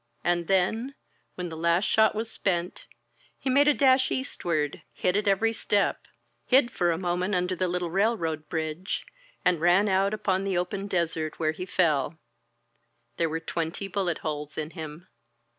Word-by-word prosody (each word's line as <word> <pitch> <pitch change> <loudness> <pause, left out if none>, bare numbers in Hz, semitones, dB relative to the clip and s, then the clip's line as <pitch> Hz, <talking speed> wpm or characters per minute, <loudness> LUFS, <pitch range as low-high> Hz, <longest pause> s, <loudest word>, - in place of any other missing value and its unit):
And 175 -1 +1
then, 220 +8 +1 0.4
when 180 -1 -4
the 160 - -7
last 170 +3 +2
shot 220 0 +4
was 220 +2 -2
spent, 180 -2 -2 0.5
he 265 - -2
made 285 +3 +5
a 295 - +6
dash 260 -1 +4
eastward, 170 - -2
hit 180 - +1
at 205 0 0
every 220 +3 +3
step; 205 -2 0 0.4
hid 250 -2 +4
for 175 -5 +1
a 165 - -1
moment 180 +2 -1
under 180 +1 0
the 185 +1 0
little 175 -1 -2
railroad 170 -7 0
bridge, 160 +3 -3 0.4
and 180 -3 +3
ran 180 +4 +4
out 195 0 +2
upon 190 -2 0
the 195 -2 0
open 195 +3 -2
desert, 165 -5 -1
where 155 -1 +1
he 180 +4 -7
fell. 160 -4 +1 1.0
There 165 -1 +1
were 160 +1 -2
twenty 165 +4 -3
bullet 185 -3 -1
holes 150 -1 -4
in 155 0 -3
him. 160 +1 -8
180 Hz, 165 wpm, -27 LUFS, 165-200 Hz, 1.0 s, a